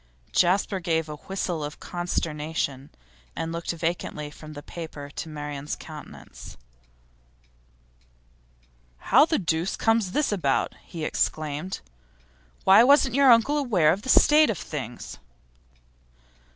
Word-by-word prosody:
Jasper 190 +2 +2
gave 165 -2 -1
a 150 - -6
whistle 180 -3 -3
of 145 +1 -6
consternation, 155 -5 -3 0.5
and 165 0 -3
looked 170 0 -5
vacantly 165 -3 -3
from 155 +1 -11
the 145 0 -9
paper 150 -4 -8
to 160 - -6
Marian's 145 -1 -5
countenance. 155 -2 -11 2.4
'How 290 - +5
the 320 - +1
deuce 170 0 -1
comes 225 -4 +1
this 295 -5 +1
about?' 155 -10 0
he 160 -3 -6
exclaimed. 155 +5 -2 0.8
'Why, 195 +4 +7
wasn't 270 -1 +5
your 275 -1 +6
uncle 255 +6 +4
aware 185 - +3
of 195 - -5
the 260 - -8
state 300 +3 +6
of 220 - -1
things? 130 -6 -7
170 Hz, 120 wpm, -25 LUFS, 150-205 Hz, 2.4 s, Why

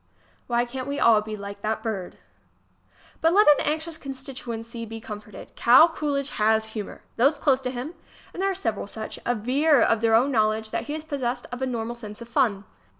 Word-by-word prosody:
Why 240 0 +1
cant 255 +2 -6
we 285 0 -2
all 220 -2 +5
be 215 0 -6
like 200 0 -8
that 215 +1 -2
bird! 200 -6 -4 1.0
But 325 +1 +4
let 415 +2 +5
an 295 - +6
anxious 315 +2 -2
constituency 245 -4 -7
be 225 0 -7
comforted: 210 -3 -10
Cal 260 +8 +7
Coolidge 285 -3 -2
has 220 +1 +3
humor! 210 -3 -6
Those 275 +5 +4
close 270 -3 +2
to 255 - -2
him 250 +3 -4
ŌĆö - - -13 0.4
and 365 - -5
there 390 - +2
are 385 - -1
several 225 - -3
such 220 +1 -7
ŌĆö 240 -2 -3
aver 290 +2 +4
of 225 -1 +2
their 225 -1 +4
own 255 +5 +3
knowledge 215 -2 +1
that - - -2
he 295 - -4
is 310 - -6
possessed 255 -5 -3
of 245 +1 -6
a 265 - 0
normal 235 -2 -3
sense 210 -3 -9
of 235 - -9
fun. 230 -6 +1
240 Hz, 210 wpm, -25 LUFS, 220-280 Hz, 1.0 s, Cal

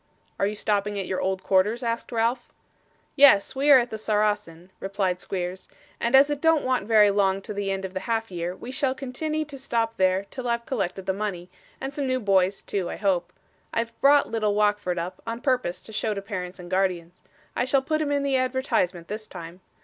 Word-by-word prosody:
'Are 195 - +2
you 210 - -3
stopping 205 0 0
at 195 - -2
your 185 - -2
old 190 0 -1
quarters?' 205 +6 +2
asked 230 +1 -2
Ralph. 235 +2 0 0.6
'Yes, 270 -8 +6
we 280 +2 +1
are 280 - +10
at 245 -1 0
the 220 - -5
Saracen,' 205 -5 -1
replied 190 -2 -1
Squeers, 185 0 -4 0.3
'and 235 +3 +2
as 280 +2 +6
it 290 -1 -2
don't 325 -2 +3
want 255 -6 0
very 210 -2 +6
long 195 -1 +2
to 210 - -5
the 200 -1 -2
end 195 0 -2
of 190 - -7
the 185 - -2
half 225 0 -2
year, 175 0 -3
we 245 - -8
shall 265 -1 0
continney 305 +4 -3
to 280 -2 -9
stop 230 -3 -1
there 185 +1 +2
till 255 -2 -5
I've 235 0 -1
collected 195 -6 -3
the 190 - 0
money, 190 -3 -4 0.3
and 270 +1 -5
some 280 -1 -2
new 255 0 +1
boys 195 -3 +2
too, 190 -4 -2
I - - -4
hope. 180 -3 0 0.4
I've 230 0 -2
brought 285 +1 +5
little 215 -2 0
Wackford 205 -4 +1
up, 170 +2 -5
on 230 +1 -3
purpose 250 - -1
to 220 - -11
show 215 0 -1
to 200 - -4
parents 185 -3 -5
and 175 -1 -10
guardians. 180 -2 -1 0.3
I 245 - +1
shall 265 +1 +2
put 310 +2 0
him 295 -2 -1
in 285 -1 +1
the 275 -1 +2
advertisement, 255 -10 0
this 215 +1 -6
time. 170 +2 -10
210 Hz, 215 wpm, -25 LUFS, 190-255 Hz, 0.6 s, are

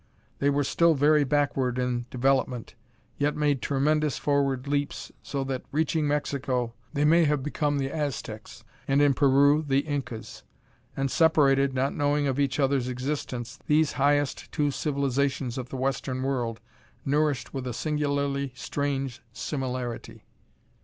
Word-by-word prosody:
They 140 - +2
were 145 0 +2
still 165 +4 +3
very 150 +2 +4
backward 135 -3 0
in 125 -1 -1
development, 130 -2 0 0.5
yet 145 +1 +1
made 145 -3 +1
tremendous 150 +1 +1
forward 140 -2 0
leaps, 145 0 -2
so 140 -1 -3
that, 135 -1 -3
reaching 155 0 +1
Mexico, 135 -4 -1 0.2
they 145 -1 +1
may 165 +2 +5
have 150 -2 +1
become 145 0 0
the 135 0 -1
Aztecs, 140 -8 -5 0.2
and 135 +1 +3
in 145 -1 +5
Peru, 140 +2 +4
the 135 0 +3
Incas. 135 -7 -5 0.6
And 135 -1 0
separated, 140 -4 +3
not 135 +2 0
knowing 145 0 +1
of 135 0 0
each 140 0 0
other's 135 -2 +2
existence, 130 -1 -4
these 150 0 +3
highest 145 0 +1
two 145 -2 +1
civilizations 140 -3 -1
of 125 0 -6
the 135 - -5
Western 130 0 -2
World 120 -4 -2 0.4
nourished 145 -2 0
with 130 -2 -4
a - - -2
singularly 140 -1 -1
strange 135 +1 -3
similarity.... 125 -2 -4
140 Hz, 140 wpm, -27 LUFS, 130-145 Hz, 0.6 s, may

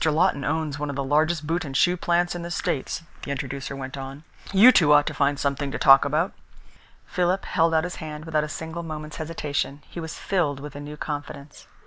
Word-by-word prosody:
Lawton 160 -1 +2
owns 155 -1 -1
one 150 0 -2
of 140 - -4
the 140 - -1
largest 155 +3 +1
boot 165 +3 -1
and 135 -3 -3
shoe 180 0 +4
plants 175 0 +1
in 175 - -5
the 170 - -5
States," 165 -2 -2 0.2
the - - -7
introducer 140 0 -4
went 135 0 -6
on. 135 +2 -7 0.3
"You 205 +6 +8
two 155 -11 +4
ought 145 0 +6
to - - -3
find 145 0 +1
something 140 0 -1
to - - -3
talk 135 0 +7
about." 155 +7 0 0.7
Philip 180 +1 0
held 165 -1 +2
out 160 - +3
his 180 0 -5
hand 155 -1 -7
without 155 -2 +1
a 150 - -4
single 160 +2 -5
moment's 155 -2 -7
hesitation. 150 -2 -3
He - - -8
was 160 -1 -6
filled 160 -8 0
with 145 0 -9
a - - -6
new 150 +1 -8
confidence. 145 -1 -7
150 Hz, 215 wpm, -25 LUFS, 140-165 Hz, 0.7 s, You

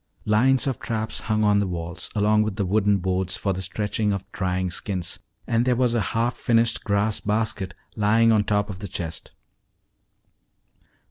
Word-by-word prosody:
Lines 125 +5 +3
of 135 -4 -2
traps 110 -1 -3
hung 110 -2 0
on 105 -1 +4
the 100 - 0
walls, 85 0 -5
along 105 +1 +3
with 110 -2 -1
the 100 - -1
wooden 100 +1 +2
boards 95 0 -1
for 100 0 -1
the 95 - -4
stretching 105 +3 -1
of 100 -1 -3
drying 90 -1 -1
skins, 90 0 -3 0.3
and 115 0 +1
there 125 0 +2
was 125 -1 +2
a 120 - +1 0.2
half 120 +2 +1
finished 115 0 +1
grass 105 +1 0
basket 105 -3 -1 0.2
lying 110 +2 +4
on 110 -2 +4
top 105 0 0
of 95 - -8
the 100 - -5
chest. 85 -3 -5
105 Hz, 175 wpm, -24 LUFS, 95-110 Hz, 0.3 s, on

